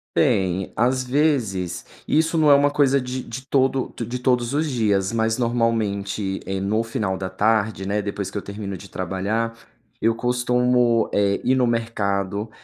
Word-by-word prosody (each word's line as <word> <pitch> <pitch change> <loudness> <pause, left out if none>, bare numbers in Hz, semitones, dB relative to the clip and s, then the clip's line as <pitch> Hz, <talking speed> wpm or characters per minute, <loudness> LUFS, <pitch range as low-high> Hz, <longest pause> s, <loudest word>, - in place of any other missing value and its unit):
Tem. 95 - +1
Às 130 +2 +1
vezes 125 - 0 0.2
isso 160 +2 +2
não 155 -2 +4
é - - +9
uma 140 +1 +4
coisa 140 -1 +3
de 125 0 -4
de 130 +3 -8
todo 135 -1 +1
de 120 +2 -4
todos 125 -1 +1
os 155 +1 +1
dias, 105 -6 +1
mas 110 0 0
normalmente, 105 -5 -1
eh, 95 0 -3
no 105 +3 0
final 110 -4 -2
da 95 0 -4
tarde, 105 0 +1
né, 105 +1 0
depois 100 -1 -4
que - - -9
eu 100 - -2
termino 100 -1 -6
de 100 - -12
trabalhar, 100 +5 -2 0.5
eu 115 +1 +4
costumo, 125 -1 +2
eh, 100 -1 +2
ir 130 - +3
no 130 -1 +2
mercado, 105 -3 -1
115 Hz, 165 wpm, -22 LUFS, 100-125 Hz, 0.5 s, é